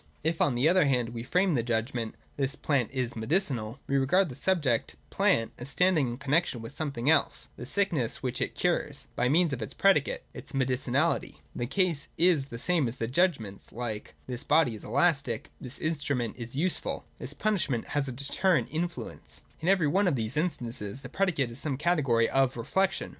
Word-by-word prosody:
If, 160 +1 0
on 135 - +3
the 125 +5 +3
other 180 -1 +5
hand, 125 -4 +1
we 115 -1 -5
frame 180 +8 +2
the 125 - +2
judgment, 115 0 -2
' - - -34
This 135 0 0
plant 140 -7 0
is 130 -3 -2
medicinal,' 120 - -1
we 140 - +1
regard 165 +7 +3
the 125 - -8
subject, 145 -11 +1 0.2
plant, 115 0 +2
as 125 +3 -6
standing 170 -2 +3
in 120 0 -4
connexion 140 0 +1
with 115 0 -8
something 140 -5 -3
else 155 -2 +2
(the 120 - -8
sickness 170 - 0
which 125 -1 -2
it - - -1
cures), 170 -5 -1
by 125 +1 +1
means 165 +1 +3
of 125 - -4
its 110 - -4
predicate 190 -8 +3
(its - - -10
medicinahty). 130 +3 0 0.2
The 120 - -2
case 175 -1 0
is 165 -5 +4
the 120 -4 -8
same 165 +3 +2
with 120 +2 -4
judgments 130 - 0
like: 115 -3 -5
This 125 0 -3
body 150 -5 +3
is 110 - -9
elastic: 140 -2 +1
This 130 +1 -6
instrument 145 -7 -1
is 120 +1 -6
useful: 175 +5 -1
This 135 +4 -6
punishment 170 - 0
has 145 -2 0
a - - -3
deterrent 150 +7 +1
influence. 170 +2 -5 0.2
In 165 - -4
every 185 -5 +4
one 190 +6 +2
of 165 - +2
these 115 +2 -3
instances 125 - -2
the 125 - -8
predicate 165 -11 0
is 115 - -6
some 140 -3 -2
category 140 -8 +2
of 135 -2 +2
reflection. 190 +11 0
140 Hz, 190 wpm, -29 LUFS, 120-165 Hz, 0.2 s, other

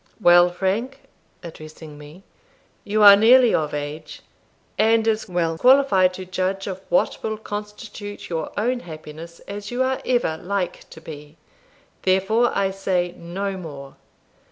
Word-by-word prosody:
Well, 175 -3 +6
Frank" 205 +10 -3 0.4
(addressing 155 -2 -11
me), 150 +6 -14 0.6
"you 210 +1 +1
are 200 -1 +10
nearly 235 +3 +5
of 150 -2 0
age, 150 +1 -6 0.5
and 225 0 +2
as 220 -2 -1
well 165 -2 -1
qualified 250 -9 +4
to 185 - -8
judge 185 +1 -2
of 190 -1 -6
what 175 - +1
will 220 -1 -3
constitute 210 0 -8
your 165 -2 -4
own 245 +4 0
happiness 160 -2 -11
as 200 0 -8
you 245 +1 -1
ever 255 -1 0
are 160 - -4
like 190 0 -4
to 160 - -13
be; 150 -1 -11 0.6
therefore, 195 +6 +2
I 195 -1 +1
say 185 -2 -2
no 190 +3 -5
more. 140 -6 -10
190 Hz, 140 wpm, -22 LUFS, 165-215 Hz, 0.6 s, are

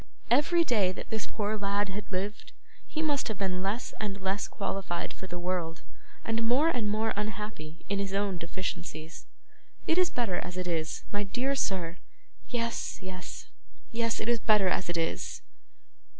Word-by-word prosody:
Every 315 +7 +6
day 210 - +4
that - - -7
this 220 -1 -1
poor 210 0 0
lad 200 0 +1
had 200 +2 -5
lived, 195 +3 -2 0.3
he 315 - -1
must 290 -3 +2
have 220 -4 -2
been 185 -2 0
less 205 +6 -1
and 200 -2 -2
less 195 +1 0
qualified 195 -3 -2
for 190 - -8
the 175 -1 -4
world, 175 -2 -1 0.4
and 225 0 +1
more 255 +8 +5
and 235 -9 +1
more 215 +2 +2
unhappy 210 -6 -4
in 200 0 +1
is 200 -1 -1
own 195 -2 +1
deficiencies. 170 -2 -4 0.6
It 330 - +4
is 365 - +5
better 225 -8 0
as 180 +1 -4
it 185 - -1
is, 160 -2 -1
my 205 - +1
dear 245 +7 +1
sir. 180 -9 0 0.5
Yes, 230 -2 -1
yes, 185 -1 -6 0.5
yes, 230 -1 +1
it's 235 +1 +2
better 210 -4 +5
as 185 - +1
it 175 - +1
is. 165 0 -1
200 Hz, 165 wpm, -31 LUFS, 185-225 Hz, 0.6 s, Every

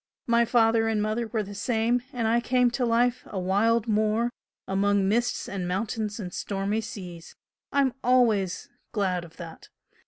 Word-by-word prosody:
My 235 0 +3
father 225 -1 +3
and 220 -1 +1
mother 215 +2 -1
were 220 -1 -1
the 205 0 -9
same, 230 +3 0
and 235 -3 -1
I 230 +2 +3
came 250 0 +2
to 245 0 0
life 240 +2 +2
a 195 - -4
wild 210 +5 +2
moor, 220 +2 +1 0.4
among 200 0 +2
mists 235 +4 0
and 190 -3 -4
mountains 210 +3 -2
and 180 -4 -6
stormy 200 +2 -2
seas 185 -7 -9 0.4
I'm 275 -2 +2
always 225 -7 +2 0.3
glad 185 -5 0
of 165 -1 -14
that! 165 -2 -10
220 Hz, 160 wpm, -26 LUFS, 195-235 Hz, 0.4 s, My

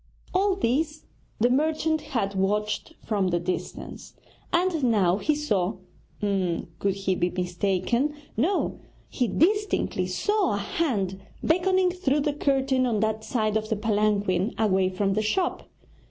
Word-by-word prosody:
All 385 +1 +3
this 300 0 -1 0.3
the 240 +3 +3
merchant 315 +3 +1
had 230 -10 -2
watched 210 +9 -1
from 200 -4 +1
the 175 -1 +1
distance, 180 +2 -5 0.4
and 345 -3 +1
now 200 -7 +3
he 300 +7 +1
saw 205 -11 0 0.4
could 190 -1 -1
he 195 -1 0
be 175 0 0
mistaken? 185 +10 0 0.2
no, 335 - 0 0.3
he 250 - 0
distinctly 415 - +1
saw 415 - +1
a - - -1
hand 200 - -1 0.2
beckoning 370 +2 +3
through 300 -6 0
the 290 0 0
curtain 270 -2 +1
on 225 -3 0
that 220 0 0
side 215 -4 0
of 215 0 -1
the 220 - +1
palanquin 205 -2 +1
away 190 -4 +2
from 195 +1 0
the 215 - +1
shop. 350 - -1
220 Hz, 140 wpm, -26 LUFS, 195-305 Hz, 0.4 s, All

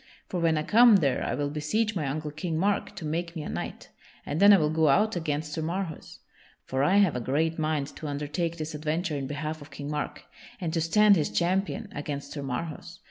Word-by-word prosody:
For 180 - -2
when 165 -2 +2
I 155 - 0
come 230 +4 +7
there 140 -9 +2
I - - -1
will 145 -1 -2
beseech 205 +9 -1
my 155 -6 -1
uncle 150 +2 -3
King 160 +2 -3
Mark 200 +4 0
to 160 - -6
make 170 +3 -3
me 160 - -4
a - - -6
knight, - - -6 0.4
and 145 - -2
then 200 +1 +8
I 200 - +8
will 155 -3 +1
go 160 -1 +3
out 210 +10 +3
against 150 -2 -2
Sir 160 - -2
Marhaus. 170 0 -4 0.5
For 130 +1 -1
I 185 +7 +4
have 195 -8 +4
a - - -1
great 160 +6 0
mind 155 -2 -1
to 155 - -6
undertake 150 +4 -2
this 155 0 -5
adventure 155 +2 -2
in 135 -2 -3
behalf 155 +2 -4
of 145 - -11
King 140 +1 -6
Mark, 150 -1 -4 0.3
and 170 -4 -3
to 165 - +1
stand 205 +5 +5
his 150 - 0
champion 195 +4 0
against 145 -1 -5
Sir 145 - -5
Marhaus. 160 +5 -5
155 Hz, 225 wpm, -27 LUFS, 150-175 Hz, 0.5 s, then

